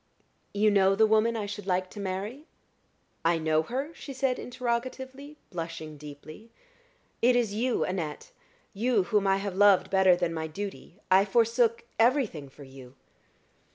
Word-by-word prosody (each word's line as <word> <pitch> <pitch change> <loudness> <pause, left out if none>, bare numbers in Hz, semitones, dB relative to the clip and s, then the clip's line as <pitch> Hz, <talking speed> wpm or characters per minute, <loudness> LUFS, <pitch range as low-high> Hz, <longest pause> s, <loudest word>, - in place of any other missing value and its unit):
"You 210 +1 +3
know 195 -1 +4
the 220 +2 +5
woman 220 +2 +2
I 210 - -3
should 205 -1 -7
like 185 0 0
to 210 - -9
marry?" 200 - -5 0.8
"I 165 0 +3
know 155 -1 +1
her?" 265 - -4
she 280 - -9
said, 260 -1 0
interrogatively, 260 +4 -4
blushing 165 -3 -6
deeply. 150 +8 -11 0.7
"It 245 +1 +4
is 235 -4 +1
you, 240 +3 0
Annette 165 -5 -4 0.4
you 225 0 +1
whom 205 -1 +1
I 195 0 +3
have 195 -1 -4
loved 205 -1 +5
better 190 -2 +5
than 175 -1 -1
my 160 -1 -3
duty. 190 +1 -7
I 190 +1 +7
forsook 230 +2 +2 0.2
everything 225 - +2
for 140 - -14
you." 130 -1 -13
205 Hz, 155 wpm, -28 LUFS, 175-235 Hz, 0.8 s, I